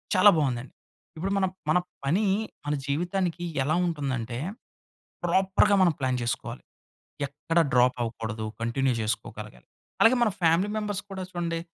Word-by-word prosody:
చాలా 185 +3 +8
బావుందండి. 130 -4 -1 0.4
ఇప్పుడు 190 +5 -2
మనం 190 -1 +2 0.2
మన 155 - +5 0.3
పని 175 +10 +2 0.4
మన 145 - 0
జీవితానికి 175 +3 -1 0.2
ఎలా 155 +4 +1
ఉంటుందంటే, 130 -7 -2 0.9
ప్రాపర్‌గా 190 +3 +3
మనం 175 -3 +5
ప్లాన్ 130 -2 0
చేసుకోవాలి. 120 - -3 0.7
ఎక్కడ 150 +4 -1
డ్రాప్ 125 0 +4
అవ్వకూడదు. 110 -1 -4 0.2
కంటిన్యూ 125 +3 +1
జేసుకోగలగాలి. 105 - -5 0.3
అలాగే 225 +3 +7
మన 230 - +3
ఫ్యామిలీ 170 +4 +3
మెంబర్స్ 205 -2 -2
కూడా 190 -1 -4
చూడండి. 170 -1 -2
155 Hz, 130 wpm, -27 LUFS, 125-185 Hz, 0.9 s, చాలా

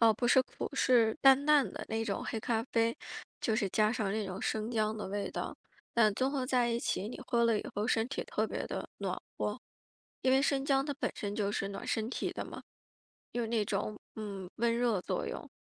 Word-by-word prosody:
哦， 225 -1 +7
不 240 +3 -1
是 260 +1 +6
苦， - - -5
是 235 -5 +4
淡 270 +1 +6
淡 295 -3 +5
的 - - -6
那 225 0 -1
种 200 -3 -2
黑 225 - -2
咖 225 0 0
啡， 230 -2 +1 0.4
就 220 - +1
是 200 - +1
加 215 +3 +3
上 210 -4 -1
那 215 -1 -1
种 190 +1 -5
生 220 +1 -1
姜 215 -1 +1
的 210 - -4
味 200 +1 -2
道。 - - -4 0.4
但 220 -3 +5
综 260 +5 +1
合 275 -2 -1
在 250 -2 +2
一 235 0 +1
起， 205 - -1
你 245 - -7
喝 235 -2 +3
了 230 -2 +3
以 - - -5
后 210 +1 0
身 225 -1 +2
体 270 - -2
特 - - 0
别 - - -3
地 - - -4
暖 - - -2 0.2
和， - - -1 0.6
因 260 - +4
为 265 - +5
生 275 -1 +1
姜 275 -1 +3
它 285 -1 -2
本 280 - -1
身 205 -1 -4
就 205 -1 0
是 195 - -1
暖 200 - -6
身 220 0 0
体 - - -2
的 - - -4
嘛， - - -8 0.7
有 240 -1 -1
那 225 -1 +1
种， 205 +1 -2 0.2
嗯， 200 -4 -5
温 230 0 +2
热 235 -5 +2
作 - - -2
用， - - -5
225 Hz, 245 characters per minute, -32 LUFS, 210-250 Hz, 0.7 s, 哦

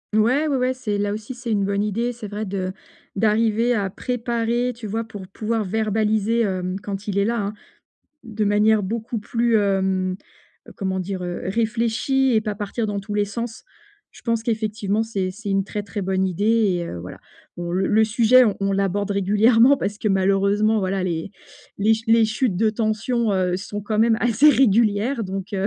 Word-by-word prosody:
Ouais, 255 +8 +3
ouais, 285 - 0
ouais, 255 0 +1
c'est 210 -5 -3
là 205 0 -1
aussi, 215 +4 -5
c'est 240 -2 -5
une 200 -2 +1
bonne 200 +1 0
idée, 230 +4 -1
c'est 225 -3 -8
vrai 210 +1 -4
de 185 -1 -3 0.5
d'arriver 225 +3 +2
à 200 -4 -1
préparer, 240 +2 -1
tu 225 -2 -8
vois? 225 +3 -2
Pour 205 -4 -10
pouvoir 215 +2 -2
verbaliser, 220 +2 +1
hem, 185 -2 -2
quand 200 0 -6
il 200 - -2
est 200 - +3
là, 215 -3 -1 0.7
de 220 -3 -3
manière 210 +1 +3
beaucoup 225 +4 -3
plus, 230 +2 +1
hem, 190 -2 +1 0.5
heu, - - -11
comment 190 -2 -2
dire? 185 0 -4
Réfléchie 230 +8 0
et 220 - +3
pas 210 -1 -3
partir 210 +2 -3
dans 205 -1 -3
tous 205 +1 -6
les 205 0 +2
sens, 230 +2 -6 0.5
je - - -15
pense 230 -1 0
qu'effectivement 215 -2 -1
c'est 200 -5 -2
c'est 205 +2 -8
une 195 0 +1
très, 205 +1 -4
très 205 0 -5
bonne 190 0 0
idée 185 +2 -2
et 205 -6 +2
heu, 90 - -6
voilà. 90 +2 -9 0.4
Bon 175 0 -4
le 190 +1 +1
le 220 +1 +4
sujet, 230 +3 +5 0.2
on 195 0 0
l'aborde 200 +1 0
régulièrement 225 +7 +4
parce 205 -4 -3
que, 215 - -1
malheureusement, 200 +3 +2
voilà, 190 0 -1
les 170 0 -3 0.5
les 210 +2 +3
les 225 0 +5
chutes 220 -2 0
de 215 +3 +2
tension, 225 +1 0
heu, 180 -2 +1
sont 205 +2 -6
quand 210 +1 -2
même 225 0 +4
assez 245 +5 +4
régulières 230 -1 +2
donc 195 0 -5
heu, 195 0 0
210 Hz, 185 wpm, -22 LUFS, 195-230 Hz, 0.7 s, sujet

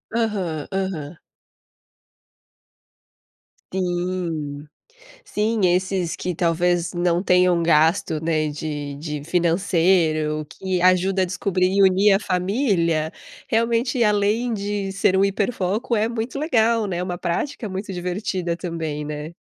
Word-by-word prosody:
Aham, 195 -10 -1
aham. 185 -5 -3 2.6
Sim, 175 -5 -2 0.6
sim 220 - -1
esses 180 -1 0
que 180 -1 -3
talvez 175 +1 +1
não 175 0 +1
tenham 180 -2 +3
gasto, 160 0 +2
né, 155 -2 +1
de 145 -1 -5
de 150 0 -5
financeiro, 165 -3 +1
que 185 +2 -3
ajuda 185 +1 +3
a 185 - +4
descobrir 185 -1 0
e 200 +1 +3
unir 195 +2 +5
a - - +3
família, 180 - 0 0.3
realmente 230 +2 +1
além 210 +3 +2
de 200 -1 -3
ser 190 -1 +2
um 190 - +4
hiperfoco 200 +2 0
é 220 +1 +1
muito 235 +3 -4
legal 230 -7 +2
né, 180 -2 -2
uma 180 -1 -4
prática 205 +8 -3
muito 195 +1 -5
divertida 180 -1 -2
também, 160 -4 -4
né. 150 +2 -6
180 Hz, 115 wpm, -22 LUFS, 165-200 Hz, 2.6 s, unir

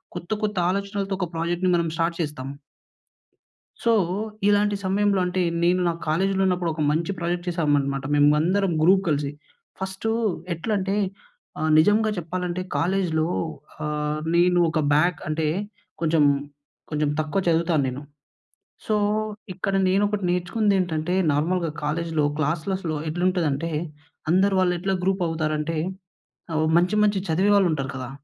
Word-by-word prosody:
కొత్త 175 +3 -7
కొత్త 210 -2 -1
ఆలోచనలతో 200 0 -2
ఒక 180 - -1
ప్రాజెక్ట్‌ని 175 +2 0
మనం 170 -1 +1
స్టార్ట్ 165 +1 0
చేస్తాం. 150 -4 -4 1.4
సో 235 - +3 0.6
ఇలాంటి 205 0 +3
సమయంలో 200 +1 +2
అంటే 180 +1 -1 0.2
నేను 180 +1 +3
నా - - +2 0.2
కాలేజ్‌లో 190 +5 +1
ఉన్నప్పుడు 180 -2 +1
ఒక 155 - -4
మంచి 165 +5 0
ప్రాజెక్ట్ 175 +1 -2
చేసామనమాట 145 -5 0
మేము 145 0 +5
అందరం 190 +3 +1
గ్రూప్ 190 +3 +5
కలిసి. 145 -1 0 0.5
ఫస్టూ 190 +3 -2 0.4
ఎట్లంటే 195 +3 -1 0.6
ఆహ్, 155 - 0
నిజంగా 210 +6 +4
చెప్పాలంటే 180 +1 -3 0.2
కాలేజ్‌లో 170 -3 +1 0.6
ఆహ్, 150 0 -2 0.2
నేను 175 +1 +4
ఒక 160 0 0
బ్యాక్ 165 +2 +2
అంటే 155 0 0 0.5
కొంచెం 160 -2 +3 0.7
కొంచెం 150 -1 0
తక్కువ 155 +5 0
చదువుతాను 165 -3 +2
నేను. 130 +3 -4 0.9
సో 215 - +2 0.6
ఇక్కడ 195 +2 -2
నేనొకటి 200 +1 +1
నేర్చుకుందేంటంటే 180 -3 0 0.2
నార్మల్‍గా 165 +2 0
కాలేజ్‌లో 160 0 0
క్లాస్లెస్‌లో 160 +2 -1
ఎట్లుంటుందంటే 165 -3 0 0.6
అందరు 195 +3 +3
వాళ్ళు 180 -1 +2
ఎట్లా 195 +1 -1
గ్రూప్ 190 -1 +1
అవుతారంటే 155 0 -1 0.8
అవొ 155 0 +1
మంచి, 180 +4 +2
మంచి 205 -2 +2
చదివే 190 +6 +3
వాళ్ళు 195 -3 +4
ఉంటారు 135 -2 -3
కదా! 130 -1 -5
175 Hz, 125 wpm, -24 LUFS, 155-190 Hz, 1.4 s, మేము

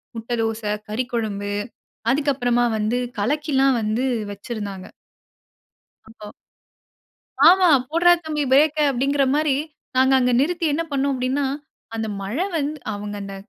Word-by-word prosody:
முட்டை 230 +2 -3
தோசை, 220 -1 -2 0.2
கறிக்குழம்பு 215 -4 -3 0.6
அதுக்கப்புறமா 250 -4 +1
வந்து 215 +3 0 0.2
கலக்கி 295 +8 -1
எல்லாம் 270 -1 +4
வந்து 215 +4 -1 0.3
வச்சிருந்தாங்க. 200 -2 -6 1.2
அப்போ 215 -2 -11 1.2
ஆமா, 365 0 +6 0.2
"போடுறா 350 +2 +5
தம்பி 300 -2 -2
பிரேக்க" 305 +2 +4
அப்படிங்கிற 275 +2 +1
மாரி, 300 -2 +2 0.4
நாங்க 260 +1 +4
அங்க 250 -1 +2
நிறுத்தி 340 +3 0
என்ன 330 +3 0
பண்னோம் 280 0 0
அப்படின்னா, 260 +3 -1 0.5
அந்த 220 -1 -3
மழை 230 - -2
வந்து 300 0 -2 0.2
அவங்க 205 0 -6
அந்த 195 0 -7
255 Hz, 120 wpm, -22 LUFS, 220-290 Hz, 1.2 s, ஆமா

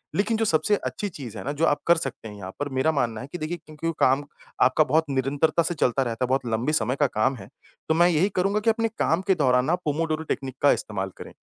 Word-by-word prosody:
लेकिन 215 +3 +1
जो 225 - +1
सबसे 205 +3 +2
अच्छी 205 - -3
चीज़ 125 - -8
है - - -6
ना, 140 - -2
जो 155 +3 +1
आप 145 -2 +2
कर 170 - +6
सकते 135 -7 -5
हैं 105 - -9
यहाँ 95 -2 -8
पर 145 - -2
मेरा 155 +5 +3
मानना 120 -7 -1
है 130 - -8
कि 175 - -4
देखिए 155 +2 -4
क्योंकि 155 +1 -5
काम 135 +3 +3 0.4
आपका 130 +5 +5
बहुत 155 +3 +2
निरंतरता 140 +5 +1
से 175 - -1
चलता 135 -2 +1
रहता 120 0 -2
है, - - -6
बहुत 130 0 +1
लंबे 115 +6 0
समय 125 -2 +1
का 145 - +5
काम 110 +3 0
है, 95 -6 -11 0.4
तो - - +4
मैं 175 +1 +5
यही 175 +4 +2
करूँगा 195 +3 +1
कि 220 +2 +1
अपने 225 0 +1
काम 165 +3 +2
के 190 - +4
दौरान 125 -5 +3
ना 165 +5 +2
पोमोडोरो 155 +1 -1
टेक्निक 130 -2 -3
का 145 - +7
इस्तेमाल 95 -2 -2
करें। - - -9
145 Hz, 255 wpm, -25 LUFS, 130-165 Hz, 0.4 s, का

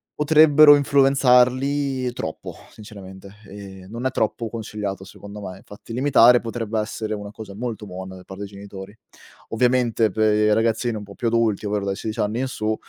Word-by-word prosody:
potrebbero 150 -1 +6
influenzarli 135 -1 +2
troppo 80 -9 -7 0.2
sinceramente, 100 -2 -12
ehm, 95 -2 -11
non 120 +3 -6
è - - -3
troppo 110 -1 -2
consigliato, 105 -3 -6
secondo 100 +2 -11
me. 90 +1 -9
Infatti 105 +3 -12
limitare 125 -2 +5
potrebbe 115 -1 -4
essere 110 0 -4
una 105 -1 -6
cosa 105 -2 -10
molto 110 -1 -6
buona 95 0 -8
da 90 - -13
parte 95 +2 -9
dei 100 - -13
genitori. 100 +1 -11 0.5
Ovviamente 120 -2 +1
per 110 +2 +1
i 105 0 +2
ragazzini 115 +1 0
un 105 - -7
po' 100 0 -12
più 120 - -3
adulti 115 -3 0
ovvero 100 -1 -2
dai 95 0 -2
16 110 +2 -6
anni 105 +4 -1
in 130 - -1
su 110 -3 -2
110 Hz, 170 wpm, -22 LUFS, 100-125 Hz, 0.5 s, potrebbero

